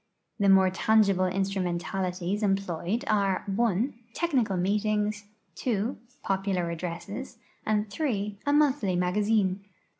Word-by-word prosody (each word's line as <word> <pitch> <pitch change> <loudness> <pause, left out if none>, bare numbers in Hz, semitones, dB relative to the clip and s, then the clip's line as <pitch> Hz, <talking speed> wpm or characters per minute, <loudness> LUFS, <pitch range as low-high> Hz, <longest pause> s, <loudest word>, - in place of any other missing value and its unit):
The 200 -1 +3
more 190 -1 +6
tangible 200 -2 +3
instrumentalities 185 0 -2
employed 195 - -1
are 200 -5 +1
(1) 220 +4 +1 0.2
technical 255 - +1
meetings, 210 +2 0 0.3
(2) 230 0 -1 0.3
popular 190 -3 -1
addresses, 180 +9 -6 0.3
and 215 0 +1
(3) 210 -5 -2
a - - +4
monthly 285 -10 +3
magazine. 195 +1 +1
200 Hz, 100 wpm, -28 LUFS, 185-215 Hz, 0.3 s, more